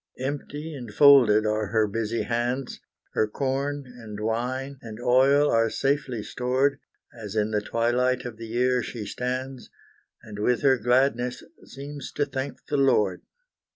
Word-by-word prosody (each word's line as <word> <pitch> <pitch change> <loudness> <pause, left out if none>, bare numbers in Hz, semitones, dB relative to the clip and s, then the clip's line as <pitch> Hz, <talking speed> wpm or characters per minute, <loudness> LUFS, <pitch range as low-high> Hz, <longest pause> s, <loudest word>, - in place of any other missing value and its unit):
Empty 145 +4 -5
and 125 -6 -8
folded 120 -5 +6
are 105 0 0
her 110 +2 +2
busy 115 +2 -2
hands; 120 +2 -2 0.3
Her 110 - +2
corn 140 +4 -2
and 115 -4 -10
wine 125 +5 -3
and 110 -1 -9
oil 135 +4 +4
are 115 0 +3
safely 135 -3 -1
stored, 130 +4 0 0.3
As 110 -3 -8
in 105 0 +1
the 105 -1 +1
twilight 125 +3 0
of 120 -3 -6
the 115 0 -8
year 125 +2 +1
she 115 -3 -6
stands, 130 +3 -4 0.5
And 105 -3 -9
with 125 +4 +1
her 135 -2 +4
gladness 125 +1 +1 0.2
seems 140 +1 -8
to 145 - 0
thank 135 0 -5
the 145 - -1
Lord. 105 -9 +2
125 Hz, 150 wpm, -25 LUFS, 110-135 Hz, 0.5 s, folded